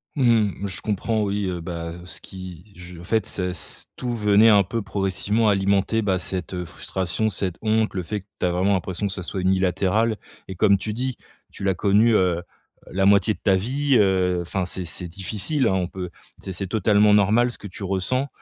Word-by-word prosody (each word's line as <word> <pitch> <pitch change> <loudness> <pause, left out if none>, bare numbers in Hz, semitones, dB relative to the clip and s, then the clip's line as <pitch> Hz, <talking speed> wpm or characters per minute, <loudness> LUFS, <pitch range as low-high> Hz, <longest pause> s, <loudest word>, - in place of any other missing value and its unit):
Mmh, 110 -7 +2
je 95 - -4
comprends, 110 +1 -1
oui, 100 -1 -1
heu, 90 -1 -3
bah, 85 0 -5
heu, 85 +1 -10
ce 90 - -8
qui 95 0 -10
je 90 -1 -10
en - - -10
fait, 110 +2 0
c'est 90 -1 -2
s 90 -3 -3
tout 125 -1 -3
venait 105 0 +5
un 100 -2 +6
peu 110 +3 -3
progressivement 100 +3 0
alimenter 100 +2 +1
bah 95 -3 +1
cette, 95 0 -4
heu, 90 -1 -3
frustration, 95 +4 -2
cette 90 -2 -2
honte, 110 -1 +1
le 90 - -2
fait 105 +4 -3
que 95 - -31
tu - - 0
as 90 - +2
vraiment 95 +3 +1
l'impression 95 +2 -2
que 95 - -4
ça 95 -2 -5
soit 95 - -4
unilatéral 95 +4 +1 0.3
et 95 - -6
comme 100 +2 +4
tu 105 +3 -4
dis, 125 +2 -3 0.3
tu - - -9
l'as 95 -1 +2
connu, 105 +5 +3
heu 90 -4 +3
heu, 85 - -6 0.5
la 95 +1 +2
moitié 100 +1 +4
de - - -14
ta 95 - +3
vie, 130 +7 +1
heu, 95 -3 +2
enfin, 90 +2 -2
c'est 90 0 -2
c'est 90 +2 -4
difficile, 100 - 0
hein, 95 - +2
on 90 -2 0
peut 90 -2 -7 0.3
c'est 95 - -7
c'est 95 +2 -3
totalement 105 0 +4
normal 110 +5 +3
ce - - -9
que - - -13
tu 95 +2 -11
ressens, 95 +8 -1
95 Hz, 220 wpm, -23 LUFS, 90-110 Hz, 0.5 s, un